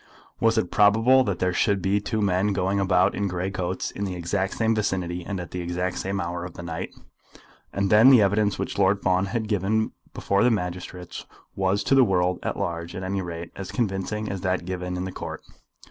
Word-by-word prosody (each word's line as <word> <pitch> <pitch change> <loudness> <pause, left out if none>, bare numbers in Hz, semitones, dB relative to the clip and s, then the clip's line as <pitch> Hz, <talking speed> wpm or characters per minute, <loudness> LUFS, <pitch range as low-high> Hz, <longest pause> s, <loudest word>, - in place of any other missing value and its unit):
Was 115 0 +3
it 95 -5 0
probable 115 +6 +5
that 100 -5 -1
there 90 0 0
should 100 0 +2
be 100 +2 +1
two 110 +1 -1
men 100 +1 +1
going 95 +1 0
about 95 0 +3
in 100 - -1
grey 90 +1 -3
coats, 95 -1 -3
in 100 - -4
exactly 95 +2 -2
the - - -11
same 115 0 +3
vicinity, 90 -5 -2
and 100 +1 -4
at 85 - -8
exactly 90 +1 -2
the - - -5
same 95 +1 -2
hour 85 -1 -3
of 90 -1 -8
the 85 - -8
night? 85 -1 -4 0.8
And 100 -1 -1
then 110 +4 +8
the 130 -3 +8
evidence 100 +1 +1
which - - -4
Lord 100 +1 +3
Fawn 95 +1 +2
had 110 +1 -2
given 105 +1 0 0.2
before 100 0 +1
the 125 - +5
magistrates 90 -3 -4 0.3
was 95 +1 +1
to - - +1
the 135 -1 +7
world 90 -4 +1
at - - -3
large 85 0 -4
at 95 - -5
any 95 +1 -2
rate 85 -1 -6
as 95 -1 -7
convincing 105 -1 -2
as 95 -3 -4
that 90 -2 -1
given 90 0 -4
in 90 - -3
the 95 - -5
Court. - - -7
95 Hz, 215 wpm, -25 LUFS, 90-100 Hz, 0.8 s, then